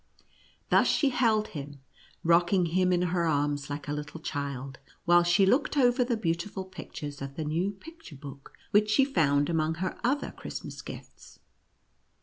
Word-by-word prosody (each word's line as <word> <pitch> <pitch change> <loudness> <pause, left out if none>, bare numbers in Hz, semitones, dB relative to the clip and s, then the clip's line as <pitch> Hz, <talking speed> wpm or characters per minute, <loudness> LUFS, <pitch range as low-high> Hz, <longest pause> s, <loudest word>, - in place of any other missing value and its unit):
Thus - - +5
she 285 - +3
held 225 -4 +2
him, 145 -2 -8 0.4
rocking 175 +2 +4
him 180 +2 +2
in 180 0 +2
her 170 -2 +1
arms 145 -1 0
like 145 0 -5
a 145 - -2
little 150 +2 -6
child, 140 -3 -5 0.3
while 175 0 +6
she 175 +3 +4
looked 280 +8 +2
over 250 -1 +4
the 240 -2 -1
beautiful 185 +1 -2
pictures 150 -6 -8
of 135 0 -6
the 155 - -3
new 165 +6 0
picture 320 - -12
book, 140 0 -11 0.2
which 210 +1 +4
she 265 +6 +4
found 145 - +2
among 160 -1 0
her 185 +3 -3
other 270 +5 0
Christmas - - -7
gifts. - - -11
170 Hz, 160 wpm, -28 LUFS, 145-210 Hz, 0.4 s, while